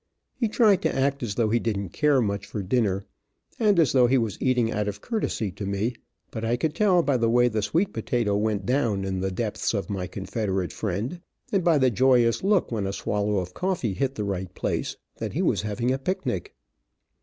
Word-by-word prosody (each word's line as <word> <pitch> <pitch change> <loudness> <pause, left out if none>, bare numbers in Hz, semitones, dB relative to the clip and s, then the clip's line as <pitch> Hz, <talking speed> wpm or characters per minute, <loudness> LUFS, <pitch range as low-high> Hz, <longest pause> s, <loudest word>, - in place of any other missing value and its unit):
He 240 -3 0
tried 210 -4 +4
to - - 0
act 140 +1 +1
as 110 -5 -3
though 115 -3 +1
he 120 - +3
didn't 100 -5 -2
care 145 - +2
much 100 -1 -2
for 105 -1 -4
dinner, 100 -2 0 0.5
and 210 -4 +3
as 155 -7 +4
though 125 -2 +5
he 135 +2 +3
was 115 -5 -2
eating 125 -3 +2
out 105 0 -1
of 100 -1 -4
courtesy 210 - -2
to 100 +3 -6
me, 100 +5 -1 0.4
but 110 - -5
I 115 +2 +1
could 155 +4 -1
tell 185 -4 +3
by 140 -4 +2
the 115 -1 +1
way 120 +1 +4
the 110 -2 -1
sweet 180 - 0
potato 115 -6 0
went 105 -1 0
down 115 -5 +1
in 95 -1 -2
the 95 +1 -1
depths 105 +3 -2
of 100 +1 -3
my 95 -2 -3
Confederate 95 -2 -3
friend, 110 - -3 0.3
and 195 -3 +2
by 165 -3 +4
the 130 -2 +3
joyous 120 - +3
look 195 -6 +2
when 105 -4 -1
a 95 - -3
swallow 105 +1 -1
of 90 -1 -3
coffee 180 - -1
hit 135 +6 -1
the 105 - -2
right 95 -2 -3
place, - - -2 0.2
that - - -4
he - - 0
was - - +2
having 115 +4 -1
a 130 - 0
picnic. 130 - -3
115 Hz, 215 wpm, -25 LUFS, 100-135 Hz, 0.5 s, though